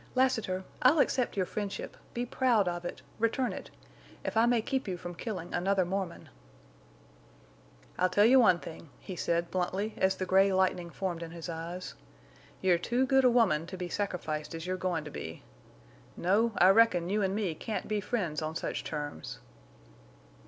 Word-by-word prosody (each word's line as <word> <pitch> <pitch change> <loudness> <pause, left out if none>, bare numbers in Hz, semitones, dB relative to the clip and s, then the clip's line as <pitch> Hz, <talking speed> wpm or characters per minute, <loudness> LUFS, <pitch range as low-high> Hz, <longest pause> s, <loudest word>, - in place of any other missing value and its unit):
"Lassiter! 225 -8 +1 0.2
I'll 260 +6 +6
accept 255 -6 +1
your 185 - +2
friendship—be 210 +4 -5
proud 240 -5 +2
of 175 0 -3
it—return 230 +7 -2
it—if - - -10
I 225 +1 +5
may 240 -1 +3
keep 265 0 -2
you 185 -2 -2
from 175 0 -7
killing 180 -2 -5
another 190 +1 +2
Mormon." 185 -1 -4 1.7
"I'll 185 0 +3
tell 205 +2 +4
you 260 +3 +7
one 220 -8 +6
thing," 165 -2 -10
he 185 - -7
said, 170 0 -1
bluntly, 190 +4 -1
as 190 0 +2
the 185 - -3
gray 195 +1 +4
lightning 185 -2 +1
formed 175 0 -3
in 165 - -5
his 170 +1 -7
eyes. 170 +2 -5 0.7
"You're 180 -2 +3
too 240 +8 +1
good 265 0 +4
a - - +7
woman 200 -10 +3
to 185 - -7
be 180 -1 -4
sacrificed 165 -6 -3
as 165 0 -6
you're 185 0 -1
goin' 180 -3 -1
to 150 - -8
be.... 80 -9 -7 0.7
No, 215 +6 +2
I 185 - +7
reckon 195 -5 +5
you 210 +2 +1
an' 195 0 0
me 200 -6 -1
can't 215 +7 -4
be 210 -1 -1
friends 190 -8 -2
on 155 +1 -3
such - - -3
terms." 145 - -5
185 Hz, 170 wpm, -30 LUFS, 175-220 Hz, 1.7 s, you